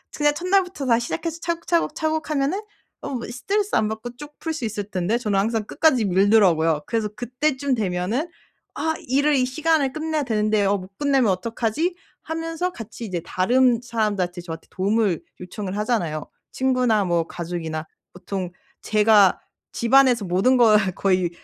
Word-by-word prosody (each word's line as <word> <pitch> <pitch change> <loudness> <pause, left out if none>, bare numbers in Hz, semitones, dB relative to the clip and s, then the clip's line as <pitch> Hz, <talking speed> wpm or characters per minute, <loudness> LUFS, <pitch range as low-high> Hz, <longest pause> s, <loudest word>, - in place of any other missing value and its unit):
그냥 295 -1 +2
첫날부터 360 -2 0
다 235 -3 +4
시작해서 330 +7 -4
차곡 335 -1 -3
차곡 335 -3 +1
차곡 315 0 -1
하면은 300 +6 0 0.4
어 - - -5
뭐 250 -4 -4
스트레스 400 - -1
안 215 -1 +2
받고 220 +3 -6
쭉 295 +3 -12
풀 325 - -3
수 310 - -6
있을 210 -2 -3
텐데 190 +4 0
저는 210 -5 -1
항상 220 +1 0
끝까지 260 -3 +2
밀더라고요. 180 -5 +3
그래서 225 -2 -1
그때쯤 260 +4 -1
되면은 210 - -1 0.5
'아 320 0 0
일을 285 +4 +3
이 255 -2 +3
시간에 300 +1 +1
끝내야 310 +1 -2
되는데 215 -3 +1
어 200 +1 +2
못 190 +1 -12
끝내면 275 -6 +2
어떡하지?' 230 - -1 0.3
하면서 330 +2 -3
같이 230 +1 -8
이제 180 -5 -3
다른 240 +7 +3
사람들한테 210 -7 -1
저한테 165 -2 -8
도움을 200 -2 +1 0.2
요청을 190 +2 -6
하잖아요. 190 -9 -1 0.3
친구나 250 -5 +2
뭐 170 -2 +1
가족이나 160 -2 -5 0.3
보통 185 0 -5 0.3
제가 210 -2 +4 0.3
집안에서 245 -2 +4
모든 190 +9 +3
걸 225 -3 +6 0.2
거의 185 -3 +1
230 Hz, 355 characters per minute, -23 LUFS, 195-285 Hz, 0.5 s, 걸